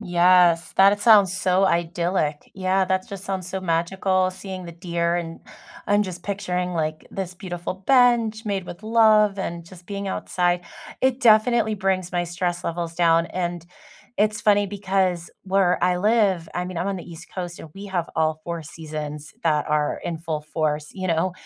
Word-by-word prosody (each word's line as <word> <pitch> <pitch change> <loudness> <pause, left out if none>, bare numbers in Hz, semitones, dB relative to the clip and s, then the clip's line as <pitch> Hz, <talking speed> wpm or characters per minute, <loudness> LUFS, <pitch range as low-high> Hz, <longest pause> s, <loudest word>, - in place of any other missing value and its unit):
Yes, 175 -3 +4
that 195 +1 +7
it 205 - -2
sounds 205 -4 +6
so 185 +1 +2
idyllic. 170 -3 -1
Yeah, 190 0 +1
that 185 0 -1
just 195 0 -7
sounds 190 -3 -3
so 190 0 -4
magical 185 +2 +1
seeing 185 -1 -8
the 170 - -8
deer, 170 0 -1
and 165 -1 -5 0.5
I'm 205 +1 +3
just 180 -3 -6
picturing, 180 -3 -2
like, 155 -2 -3
this 185 -2 -5
beautiful 180 -2 -5
bench 240 -4 +3
made 200 -3 -2
with 175 - -9
love 215 -2 +4
and 170 -2 -4
just 175 0 -15
being 200 -1 -4
outside. 180 -2 0 0.4
It 260 0 +1
definitely 220 -1 +4
brings 190 -2 -1
my 175 -1 -1
stress 175 0 -3
levels 170 0 -3
down. 165 -1 +3
And 175 -2 -4 0.5
it's 210 +1 +1
funny 205 -1 +3
because 190 -3 -1
where 190 -2 +2
I 180 0 +3
live, 200 -5 +2
I 180 - -1
mean, 180 0 -7
I'm 180 +4 -1
on 195 - -2
the 175 - -8
East 165 0 -10
Coast 180 -2 -5
and 155 - -11
we 200 +1 -8
have 180 -4 -2
all 155 0 +1
4 170 -1 -4
seasons 150 -1 -7
that 150 -3 +2
are 150 -1 0
in 165 -2 -3
full 160 -2 -3
force, 150 -1 -2
you 185 -2 -4
know? 170 +2 +1
180 Hz, 180 wpm, -23 LUFS, 170-195 Hz, 0.5 s, that